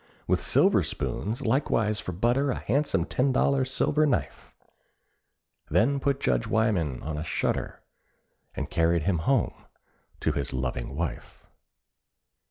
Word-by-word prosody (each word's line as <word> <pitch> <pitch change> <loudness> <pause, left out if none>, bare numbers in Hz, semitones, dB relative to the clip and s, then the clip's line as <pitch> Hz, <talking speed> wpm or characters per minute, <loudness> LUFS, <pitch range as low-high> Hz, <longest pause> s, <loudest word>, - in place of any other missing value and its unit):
With - - +1
silver - - +4
spoons; 115 +7 -3
likewise 110 -4 +1
for 105 - -4
butter 120 +10 +1
A 125 - 0
handsome 130 - 0
ten 130 +7 +1
dollar 135 +1 +2
silver 145 +4 +1
knife; 80 - -2 1.2
Then 140 +5 +2
put 140 0 0
Judge 60 - 0
Wyman 100 - 0
on 75 0 -4
a - - -3
shutter, 80 - -2 0.7
And - - -3
carried 85 -1 +2
him 90 -2 +1
home 135 -4 +2 0.7
to - - +1
his 70 -2 -3
loving 65 0 -3
wife. 85 +1 -5
105 Hz, 130 wpm, -27 LUFS, 80-130 Hz, 1.2 s, silver